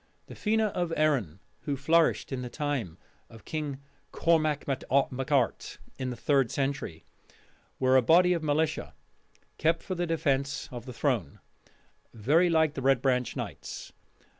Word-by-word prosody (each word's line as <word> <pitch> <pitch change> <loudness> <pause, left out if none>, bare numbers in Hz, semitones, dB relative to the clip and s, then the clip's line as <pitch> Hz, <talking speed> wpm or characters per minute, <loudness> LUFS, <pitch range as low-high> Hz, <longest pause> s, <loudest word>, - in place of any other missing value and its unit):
The - - -11
Fena 220 -1 +1
of 175 -2 -2
Erin, 135 - +1 0.3
who 145 -3 -1
flourished 160 +4 +2
in 130 -2 -3
the 125 - -5
time 135 - -3 0.3
of 115 -3 -15
King 150 -3 -3 0.3
Cormac 155 -3 +1
mac 135 -2 -2
Art, 135 -1 +1 0.2
in 130 -1 -2
the 125 - -4
third 135 +1 +2
century, 135 - -3 0.7
were 130 0 +3
a 130 - +7
body 180 +8 +5
of 170 - -1
militia 155 +1 -1 0.6
kept 165 +1 +1
for 185 - -4
the 175 -1 -2
defence 140 -4 0
of 120 0 -8
the 125 - -6
throne, 120 - -1 0.8
very 150 - +3
like 160 -2 +3
the 135 - -5
Red 135 -1 +3
Branch 125 -2 0
Knights. - - -7
140 Hz, 150 wpm, -28 LUFS, 130-160 Hz, 0.8 s, a